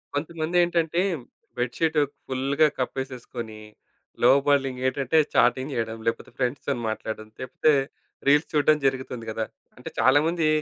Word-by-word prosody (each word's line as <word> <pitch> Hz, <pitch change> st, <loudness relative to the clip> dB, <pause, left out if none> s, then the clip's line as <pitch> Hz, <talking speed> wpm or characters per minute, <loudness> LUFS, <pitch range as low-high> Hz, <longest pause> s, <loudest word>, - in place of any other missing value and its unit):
కొంతమందేంటంటే 170 Hz, +2 st, +1 dB, 0.6 s
bed 120 Hz, 0 st, -2 dB
sheet 160 Hz, -1 st, +1 dB, 0.3 s
ఫుల్‌గా 135 Hz, +4 st, +2 dB
కపేసేసుకొని 125 Hz, -4 st, -5 dB, 0.6 s
లోబాలింగ్ 135 Hz, 0 st, +4 dB
ఏంటంటే 135 Hz, +3 st, 0 dB, 0.2 s
చాటింగ్ 130 Hz, +3 st, +3 dB
చేయడం 115 Hz, -1 st, -2 dB
లేపోతే 115 Hz, -, -1 dB
ఫ్రెండ్స్‌తోని 125 Hz, 0 st, -1 dB
మాట్లాడడం 110 Hz, 0 st, -5 dB
తెప్తే 130 Hz, +4 st, +2 dB, 0.5 s
రీల్స్ 145 Hz, +3 st, +4 dB
చూడడం 150 Hz, 0 st, +4 dB
జరుగుతుంది 130 Hz, -3 st, -1 dB
గదా! 110 Hz, 0 st, -2 dB, 0.3 s
అంటే -, -, -8 dB
చాలామంది 155 Hz, +5 st, +3 dB
135 Hz, 105 wpm, -25 LUFS, 125-155 Hz, 0.6 s, లోబాలింగ్